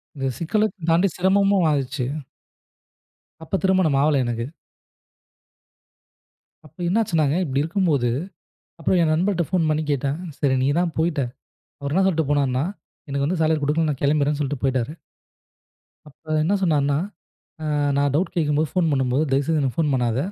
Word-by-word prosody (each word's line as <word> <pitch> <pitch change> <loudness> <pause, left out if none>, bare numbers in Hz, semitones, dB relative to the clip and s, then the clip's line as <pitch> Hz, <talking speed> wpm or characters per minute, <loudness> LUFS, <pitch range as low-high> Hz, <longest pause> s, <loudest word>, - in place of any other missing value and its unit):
இந்த 135 -1 -2
சிக்கல 190 +6 0 0.2
தாண்டி 170 +4 +4
சிரமமும் 195 0 +3
ஆயிடுச்சு. 135 -2 -1 1.4
அப்பத் 190 +4 -2
திருமணம் 185 -7 +3
ஆகல 145 -2 +3
எனக்கு. 120 -1 -2 2.2
அப்ப 155 +1 -19
என்ன 190 +6 +2
ஆச்சுன்னாங்க, 155 -8 +1
இப்படி 140 -4 0
இருக்கும்போது. 160 -7 +1 0.7
அப்ப 165 - +1
என் 160 -2 +2
நண்பன்கிட்ட 175 +2 +1
போன் 175 -4 +2
பண்ணிக் 155 0 -1
கேட்டேன். 140 +2 -1 0.2
சரி, 135 -2 +2
நீ - - +2
தான் 175 -2 0
போயிட்ட. 160 -3 +1 0.6
அவர் 140 0 -3
என்ன 190 +2 +3
சொல்லிட்டுப் 160 -6 0
போனான்னா, 135 -2 +1 0.4
எனக்கு 140 0 -1
வந்து 170 +2 -1
சாலரி 160 0 +2
குடுக்கல. 155 +2 +1
நான் 140 - -5
கிளம்பறேன். 145 0 +2
சொல்லிட்டுப் 145 -2 -3
போயிட்டாரு. 130 +1 0 1.2
அப்ப 145 - -26 0.2
என்ன 175 +6 +1
சொன்னார்ன்னா, 145 -5 +2 1.0
நான் 140 -1 +2
டவுட் 175 +6 0
கேட்கும்போது, 150 -1 +1
போன் 175 -3 +2
பண்ணும்போது 130 +1 +1
தயவு 135 +1 +2
செய்து 160 -2 +1
எனக்குப் 135 +2 -2
போன் 150 -3 +2
பண்ணாத. 120 -2 0
150 Hz, 145 wpm, -22 LUFS, 140-170 Hz, 2.2 s, தாண்டி